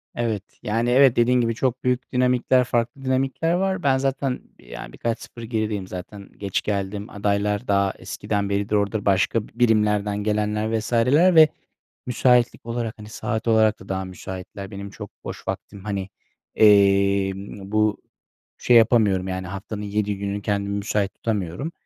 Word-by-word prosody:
Evet. 110 -4 -1 0.2
Yani, 115 +3 0
evet, 130 0 +5
dediğin 125 +1 +3
gibi, 115 -1 0
çok 130 +1 -1
büyük 125 0 -1
dinamikler, 125 0 +3
farklı 120 +2 -2
dinamikler 135 +5 0
var. 190 0 0
Ben 135 -2 +3
zaten 135 -1 -1 0.2
bir, - - -20
yani, - - -9
birkaç 115 0 -2
0 120 - -11
gerideyim 110 -4 -2
zaten 95 +2 -9
geç 100 -2 -2
geldim, 100 0 -3
adaylar 105 +2 -1
daha 100 -1 +2
eskiden 100 -1 -3
beridir 100 +1 0
orada, 100 +1 0
başka 100 +3 +2
birimlerden 105 -3 +1
gelenler 105 +1 0
vs.ler 130 +11 +3
ve 155 -1 +8 0.6
müsaitlik 125 -2 +2
olarak, 115 -1 -3
hani, 105 - -10
saat 110 +1 -3
olarak 110 -1 +3
da 95 - -13
daha 95 0 -2
müsaitler. 95 +1 -8
Benim 100 0 -7
çok 105 0 -9
boş - - -7
vaktim, 100 -1 -6
hani, 100 -2 -3 0.5
emm, 100 -1 +3
bu 110 -1 +2 0.6
şey 120 - +4
yapamıyorum, 105 -5 +4
yani, 95 0 -4
haftanın 100 +3 -6
7 105 0 -2
günü 100 +1 -3
kendimi 100 0 -1
müsait 100 -1 -1
tutamıyorum 105 - -3
105 Hz, 150 wpm, -23 LUFS, 100-120 Hz, 0.6 s, ve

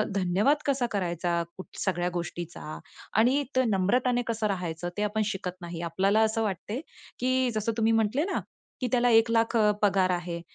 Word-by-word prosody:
धन्यवाद 195 +10 +2
कसा 275 -3 +1
करायचा 175 -3 -1 0.2
कुठ 185 - -8
सगळ्या 180 -2 0
गोष्टींचा 170 - -5 0.4
आणि 255 +6 +4
ते 260 - +4
नम्रताने 240 +5 +2
कसं 225 -2 0
राहायचं, 175 -3 -3
ते 210 - 0
आपण 210 +1 0
शिकत 185 -3 -4
नाही. 170 -1 -6
आपल्याला 195 +6 +2
असं 220 0 +2
वाटते 205 +4 -3 0.4
की 255 0 +1
जसं 215 +1 0
तुम्ही 225 0 +3
म्हटले 225 +6 +2
ना, 390 - -1 0.4
की 250 - 0
"त्याला 245 -1 +3
1 225 0 +5
लाख 230 +1 +2 0.3
पगार 195 -2 +3
आहे". 175 -1 -3
205 Hz, 165 wpm, -28 LUFS, 180-230 Hz, 0.4 s, 1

